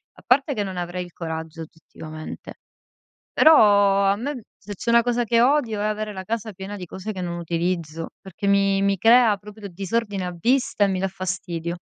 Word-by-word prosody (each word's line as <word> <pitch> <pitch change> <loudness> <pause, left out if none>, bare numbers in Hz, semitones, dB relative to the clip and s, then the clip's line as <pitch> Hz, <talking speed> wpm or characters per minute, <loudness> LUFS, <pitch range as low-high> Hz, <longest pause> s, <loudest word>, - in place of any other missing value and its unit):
a - - -18
parte 275 +3 +3
che 210 -4 -2
non 190 -1 -6
avrei 175 +1 -4
il 175 - -16
coraggio, 160 -1 -6
oggettivamente, 155 0 -10 0.8
però 200 -9 +5
a - - +1
me 255 -1 -5
se 205 0 -9
c'è 230 - -4
una 235 0 +6
cosa 245 0 0
che 230 +1 +2
odio 245 -5 +2
è - - -1
avere 215 0 -2
la 190 0 -6
casa 220 +1 -3
piena 190 +3 -7
di 180 - -7
cose 190 +5 -7
che 185 - -6
non 175 -1 -4
utilizzo, 165 -1 -3
perché 190 +1 -8
mi 195 0 +3
mi 200 0 +2
crea 225 0 +5
proprio 210 0 -10
disordine 195 +1 -3
a 180 -1 -5
vista 245 +1 +1
e - - +1
mi 190 -1 -1
dà 195 - 0
fastidio. 185 -3 -4
195 Hz, 200 wpm, -23 LUFS, 180-220 Hz, 0.8 s, una